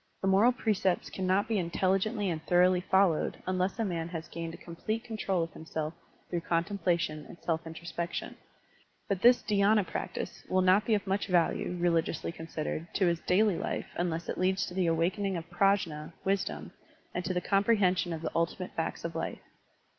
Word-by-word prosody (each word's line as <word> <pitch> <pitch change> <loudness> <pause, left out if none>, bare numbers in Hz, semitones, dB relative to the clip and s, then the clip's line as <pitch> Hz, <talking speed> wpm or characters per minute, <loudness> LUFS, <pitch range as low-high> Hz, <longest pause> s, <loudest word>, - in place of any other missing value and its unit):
The - - +2
moral 200 +6 +5
precepts 210 -7 0
cannot 190 +1 +1
be 225 - +1
intelli 185 +2 +1
gently 215 0 -1
and 160 -1 -4
thoroughly 180 0 +4
followed 190 -4 +2
unless 185 +2 0
a 225 - 0
man 170 -3 -2
has 165 -2 -5
gained 165 0 -5
a - - -11
complete 215 +7 -4
control 200 -6 -1
of 165 - -6
himself 160 0 -4 0.3
through 175 -1 -2
contemplation 170 -3 0
and 170 - -11
self 165 -1 -1
introspection. 170 +1 -5 0.7
But 195 -2 -1
this 245 +2 +6
dhy^na 205 0 +3
practice - - -5
will 185 0 +3
not 190 +3 +5
be 220 - +3
of 205 - -2
much 195 +1 0
value, 180 0 +1
religiously 170 -1 +1
considered, 165 0 -4
to 195 - +3
his 170 -1 +2
daily 195 +1 +3
life - - -3
unless 170 -1 -2
it - - -3
leads 190 +1 +2
to - - -8
the 180 -1 +1
awakening 180 +4 +1
of 165 -1 -6
PrajM 175 -5 +1
(wisdom) 195 0 -1 0.4
and 180 - -2
to 185 - -1
the - - +3
comprehension 195 -3 +2
of 165 -1 -4
the - - -2
ultimate 170 +2 -1
facts 165 0 -3
of 165 - -3
life. 165 - -4
180 Hz, 180 wpm, -30 LUFS, 165-195 Hz, 0.7 s, this